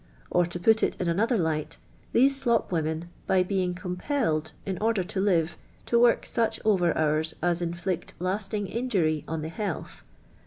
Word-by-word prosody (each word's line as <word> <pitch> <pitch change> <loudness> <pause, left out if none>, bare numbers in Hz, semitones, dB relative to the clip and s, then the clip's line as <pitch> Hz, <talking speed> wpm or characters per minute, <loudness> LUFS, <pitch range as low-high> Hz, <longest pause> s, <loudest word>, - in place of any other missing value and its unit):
Or. 175 -1 +3
to 175 0 -5
put 220 +4 +4
it - - 0
in 180 - -1
another 220 +8 +2
light, 160 -4 -1 0.3
these 270 +3 +5
slop 235 -7 +1
women, 160 0 -1 0.2
by 190 -1 +4
being 180 -1 -1
com 180 0 -5
jielled, 180 - 0
i!i 195 - -2
order 220 -3 +2
to 190 +1 -3
live, 175 -4 +1 0.3
to 235 - +3
work 240 0 +4
such 230 -2 0
ov«T 200 -5 +3
hours 155 +1 +1
as 175 0 +2
intiict 175 +1 -3
lasting 195 +3 -2
injury 190 -9 0
«»n 160 -1 -3
the 160 - -5
hialth. 200 -1 -4
180 Hz, 170 wpm, -27 LUFS, 165-215 Hz, 0.3 s, these